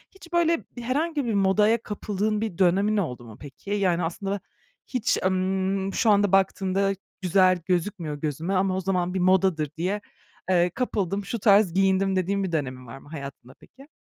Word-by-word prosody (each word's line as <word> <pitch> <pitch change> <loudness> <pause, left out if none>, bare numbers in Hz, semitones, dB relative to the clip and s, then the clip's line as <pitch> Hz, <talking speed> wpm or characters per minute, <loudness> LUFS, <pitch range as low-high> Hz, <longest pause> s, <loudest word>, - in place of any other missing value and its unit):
Hiç 345 -2 -15
böyle 335 -1 +2 0.2
herhangi 285 +4 -1
bir 230 - -1
modaya 210 +3 +3
kapıldığın 210 0 -2
bir 215 -6 -3
dönemin 195 +3 +3
oldu 125 -11 -2
mu 110 0 -12
peki? 145 +7 -11
Yani, 185 -4 +1
aslında 195 +4 -3 0.5
hiç, 250 -2 0
emm, 190 +1 0
"Şu 225 - +2
anda 205 -2 +4
baktığımda 195 0 +2 0.3
güzel 185 0 +3
gözükmüyor 175 -4 -1
gözüme 155 +5 -2
ama 190 0 +1
o - - -1
zaman 180 -1 -1
bir 190 - -1
modadır 180 -5 +2
diye, 190 +5 -1 0.5
eee, 175 -1 +3
kapıldım, 200 -5 -2
şu 235 +3 -4
tarz 200 -3 +4
giyindim." 195 0 +2
dediğin 195 +2 0
bir 185 - -3
dönemin 130 -5 -3
var 115 - -9
mı 140 - -16
hayatında 140 -4 -9
peki? 275 +3 -18
190 Hz, 165 wpm, -25 LUFS, 175-205 Hz, 0.5 s, anda